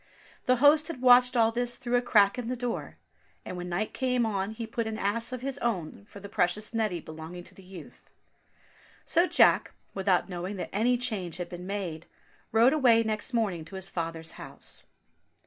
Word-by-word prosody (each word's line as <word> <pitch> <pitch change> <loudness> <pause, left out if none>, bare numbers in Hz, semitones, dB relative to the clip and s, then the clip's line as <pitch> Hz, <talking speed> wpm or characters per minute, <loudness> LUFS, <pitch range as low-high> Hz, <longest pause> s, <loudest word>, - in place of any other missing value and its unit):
The 255 - +4
host 295 +4 +5
had 330 -6 -5
watched 250 0 +6
all 225 -1 +4
this 240 +1 -2
through 245 -1 -1
a 245 - +4
crack 210 -2 +4
in 240 - -4
the 255 - -2
door, 245 -1 -4 0.5
and - - -6
when 180 0 -5
night 185 +5 -2
came 250 -2 +1
on 200 -2 -1
he 225 +1 -6
put 225 0 -3
an 220 -1 -4
ass 230 +5 -1
of 255 -1 -5
his 275 +1 -3
own 200 -4 -3
for 200 - -11
the 200 - -9
precious 200 +3 0
Neddy 215 -6 0
belonging 160 +3 -9
to - - -13
the - - -15
youth. 185 -4 -13 1.0
So 345 +1 +3
Jack, - - +4 0.2
without 190 -2 +1
knowing 180 +2 -5
that 185 - -6
any 240 +5 +2
change 200 -9 -2
had 175 -1 -5
been 180 +1 -8
made, 180 -5 -4 0.4
rode 230 +5 +5
away 240 -6 +5
next 215 +1 -2
morning 205 -9 0
to 195 - -10
his 190 0 -6
father's 165 -2 -4
house. - - -8
215 Hz, 195 wpm, -28 LUFS, 180-245 Hz, 1.0 s, watched